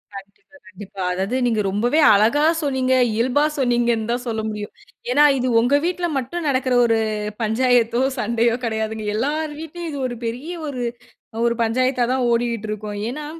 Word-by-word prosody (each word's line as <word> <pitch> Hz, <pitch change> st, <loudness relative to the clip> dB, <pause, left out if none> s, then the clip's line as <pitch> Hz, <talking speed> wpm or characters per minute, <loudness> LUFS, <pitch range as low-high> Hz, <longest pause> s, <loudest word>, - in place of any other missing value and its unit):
கண்டிப்பா, 200 Hz, +9 st, -13 dB
கண்டிப்பா. 200 Hz, -1 st, -10 dB
அதாவது, 190 Hz, +6 st, -2 dB
நீங்க 225 Hz, -3 st, +1 dB
ரொம்பவே 240 Hz, +10 st, +1 dB
அழகா 220 Hz, +9 st, +3 dB, 0.2 s
சொன்னீங்க, 260 Hz, -2 st, 0 dB, 0.2 s
இயல்பா 250 Hz, +6 st, +1 dB, 0.2 s
சொன்னீங்கன்னு 240 Hz, -3 st, +1 dB
தான் 245 Hz, +1 st, -2 dB
சொல்ல 220 Hz, -1 st, -2 dB
முடியும். 210 Hz, -1 st, -6 dB, 0.4 s
ஏன்னா, 290 Hz, +3 st, +5 dB
இது 255 Hz, -, -1 dB
உங்க 245 Hz, +5 st, +2 dB
வீட்ல 355 Hz, 0 st, -1 dB
மட்டும் 290 Hz, +6 st, -4 dB
நடக்கிற 255 Hz, -1 st, 0 dB
ஒரு 230 Hz, -1 st, +2 dB, 0.4 s
பஞ்சாயத்தோ! 235 Hz, +1 st, +2 dB, 0.2 s
சண்டையோ! 235 Hz, +1 st, +1 dB
கிடையாதுங்க. 220 Hz, -1 st, -3 dB
எல்லார் 300 Hz, +7 st, -1 dB
வீட்லயும் 330 Hz, +2 st, -7 dB
இது 285 Hz, -, -5 dB
ஒரு 240 Hz, -1 st, -6 dB
பெரிய 250 Hz, +9 st, -4 dB, 0.2 s
ஒரு, 255 Hz, -4 st, -4 dB, 0.6 s
ஒரு 235 Hz, 0 st, +1 dB
பஞ்சாயத்தா 250 Hz, +2 st, +1 dB
தான் 260 Hz, -1 st, 0 dB
ஓடிகிட்ருக்கும். 215 Hz, -3 st, -2 dB
ஏன்னா, 295 Hz, +4 st, -6 dB
240 Hz, 150 wpm, -21 LUFS, 220-265 Hz, 0.6 s, ஏன்னா